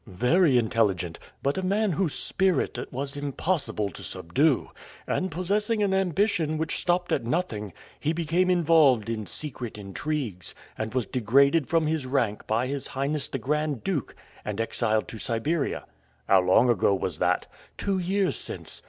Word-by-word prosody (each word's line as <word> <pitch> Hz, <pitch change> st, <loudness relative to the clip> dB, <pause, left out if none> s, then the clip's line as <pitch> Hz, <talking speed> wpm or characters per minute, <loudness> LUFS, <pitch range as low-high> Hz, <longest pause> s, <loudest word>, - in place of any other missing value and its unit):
"Very 125 Hz, -, +3 dB
intelligent, 105 Hz, -7 st, +1 dB, 0.2 s
but 140 Hz, +6 st, +1 dB
a -, -, -1 dB
man 200 Hz, +2 st, +1 dB
whose 170 Hz, -2 st, 0 dB
spirit 190 Hz, -2 st, 0 dB
it -, -, -7 dB
was 140 Hz, +2 st, -3 dB
impossible 145 Hz, -, -1 dB
to -, -, -9 dB
subdue; 135 Hz, -, 0 dB, 0.3 s
and 185 Hz, -, -1 dB
possessing 205 Hz, +6 st, 0 dB
an 195 Hz, -1 st, +1 dB
ambition 185 Hz, -3 st, +1 dB
which 160 Hz, +1 st, -1 dB
stopped 175 Hz, 0 st, 0 dB
at -, -, +1 dB
nothing, 115 Hz, -, -2 dB, 0.3 s
he 150 Hz, -, 0 dB
became 170 Hz, +2 st, +1 dB
involved 155 Hz, -, +4 dB
in 110 Hz, -3 st, -4 dB
secret 125 Hz, -, -5 dB
intrigues, 105 Hz, -, -4 dB, 0.2 s
and 110 Hz, +2 st, -4 dB
was 125 Hz, -3 st, +1 dB
degraded 140 Hz, +5 st, +3 dB
from 165 Hz, -1 st, +2 dB
his 155 Hz, -4 st, -1 dB
rank 120 Hz, -6 st, -1 dB
by 115 Hz, +3 st, +1 dB
his 140 Hz, +1 st, -3 dB
Highness 140 Hz, +2 st, -2 dB
the -, -, -2 dB
Grand 150 Hz, +1 st, -1 dB
Duke, 170 Hz, -, -2 dB, 0.3 s
and 105 Hz, 0 st, -4 dB
exiled 110 Hz, -1 st, 0 dB
to 110 Hz, -, -7 dB
Siberia." 140 Hz, +9 st, -1 dB, 0.4 s
"How 95 Hz, -1 st, +6 dB
long 95 Hz, +7 st, +4 dB
ago 100 Hz, -4 st, +3 dB
was 95 Hz, -3 st, -2 dB
that?" -, -, +1 dB, 0.3 s
"Two 195 Hz, -2 st, 0 dB
years 190 Hz, +2 st, +1 dB
since. -, -, -5 dB
140 Hz, 160 wpm, -26 LUFS, 115-170 Hz, 0.4 s, How